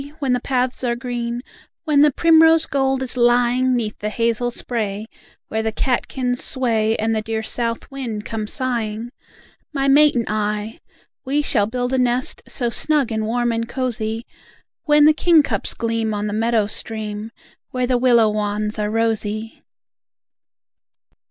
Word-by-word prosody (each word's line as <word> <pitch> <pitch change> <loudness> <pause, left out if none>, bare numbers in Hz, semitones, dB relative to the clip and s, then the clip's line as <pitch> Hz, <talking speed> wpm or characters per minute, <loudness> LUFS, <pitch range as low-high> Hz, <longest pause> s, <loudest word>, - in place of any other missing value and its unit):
When 275 -5 0
the 250 - +1
paths 255 0 -1
are 240 -1 0
green, 240 -1 -4 0.4
When 300 -3 +3
the 300 - +6
primrose 325 +1 +5
gold 270 -2 0
is 255 - 0
lying 245 +1 +2
'Neath 220 -3 -3
the 210 - -3
hazel 230 +2 0
spray, 215 -4 -4 0.4
where 220 - -2
the 220 0 -1
catkins 250 +1 -1
sway, 225 -4 +1
And 225 +1 0
the 215 - 0
dear 220 0 -3
south 230 +3 -1
wind 235 -6 -5
comes 215 -2 -4
sigh 250 -4 -1
ing. 230 +3 -7 0.6
My 275 -2 -1
mate 295 +1 +5
and 235 -2 0
I, 210 +1 -3 0.4
we 290 +2 0
shall 210 -8 +2
build 245 +2 -3
a 260 - +2
nest, 250 +4 0
So 245 - 0
snug 280 +1 +2
and 220 -1 -2
warm 240 +1 0
and 230 0 -3
cosy, 230 -3 -2 0.6
When 295 -2 +5
the 310 - +6
kingcups 300 - +2
gleam 225 -2 -2
on 205 0 -3
the 205 - -3
meadow 225 0 +1
stream, 215 0 -3 0.4
Where 255 -1 -1
the 250 -1 +1
willow 235 -3 +4
wands 210 0 -2
are 210 0 -1
rosy! 220 -1 -2
235 Hz, 160 wpm, -20 LUFS, 220-255 Hz, 0.6 s, the